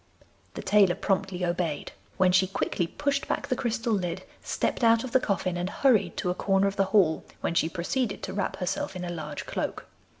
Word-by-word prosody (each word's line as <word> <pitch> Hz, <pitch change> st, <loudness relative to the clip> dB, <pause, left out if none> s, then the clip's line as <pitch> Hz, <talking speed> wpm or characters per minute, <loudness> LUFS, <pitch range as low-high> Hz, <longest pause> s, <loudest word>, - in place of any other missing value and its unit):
The -, -, -5 dB
tailor 195 Hz, -2 st, +4 dB
promptly 190 Hz, -2 st, -1 dB
obeyed, 170 Hz, -4 st, -2 dB, 0.3 s
when 185 Hz, -1 st, +4 dB
she 185 Hz, +1 st, +4 dB
quickly 185 Hz, -2 st, -1 dB
pushed 280 Hz, +8 st, -1 dB
back -, -, -1 dB
the 255 Hz, -, +2 dB
crystal 230 Hz, -1 st, -1 dB
lid, 180 Hz, -4 st, -2 dB, 0.2 s
stepped -, -, -1 dB
out 230 Hz, 0 st, +5 dB
of 260 Hz, -, -5 dB
the 260 Hz, -, +5 dB
coffin 185 Hz, -6 st, -1 dB
and 175 Hz, +1 st, -2 dB
hurried 210 Hz, -, +2 dB
to 180 Hz, -, 0 dB
a -, -, 0 dB
corner 195 Hz, +1 st, +2 dB
of 195 Hz, 0 st, 0 dB
the 195 Hz, -, +2 dB
hall, 190 Hz, -5 st, +3 dB, 0.2 s
when -, -, -1 dB
she 165 Hz, -1 st, +2 dB
proceeded 200 Hz, +7 st, -2 dB
to -, -, -4 dB
wrap 200 Hz, -1 st, -1 dB
herself 180 Hz, -, -3 dB
in 180 Hz, -1 st, -4 dB
a -, -, -4 dB
large 155 Hz, -4 st, -5 dB
cloak. -, -, -3 dB
190 Hz, 205 wpm, -27 LUFS, 175-215 Hz, 0.3 s, out